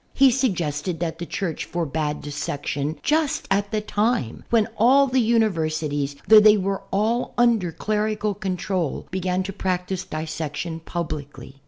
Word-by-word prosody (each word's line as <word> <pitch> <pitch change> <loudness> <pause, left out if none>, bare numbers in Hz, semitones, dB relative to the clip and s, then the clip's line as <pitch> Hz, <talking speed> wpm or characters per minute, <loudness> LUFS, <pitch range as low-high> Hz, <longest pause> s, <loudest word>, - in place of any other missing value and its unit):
He 270 -1 +6
suggested 175 - -1
that 165 -1 -3
the 170 - -5
Church 175 -6 -3
forbade 155 -3 -2
dissection, 145 0 -3
just 305 -1 +1
at 200 +1 +1
the 215 0 -1
time 210 - -1
when 225 -3 +3
all 260 +6 +5
the 260 -1 +2
universities, 155 -11 0
though 215 +1 +9
they 210 0 +7
were 195 0 -1
all 220 +5 0
under 230 -7 +3
clerical 210 +2 -1
control, 185 -4 -2
began 185 0 -1
to 195 +1 -5
practice 185 -1 -2
dissection 160 0 -4
publicly. 150 -6 -6
185 Hz, 140 wpm, -23 LUFS, 155-215 Hz, -, though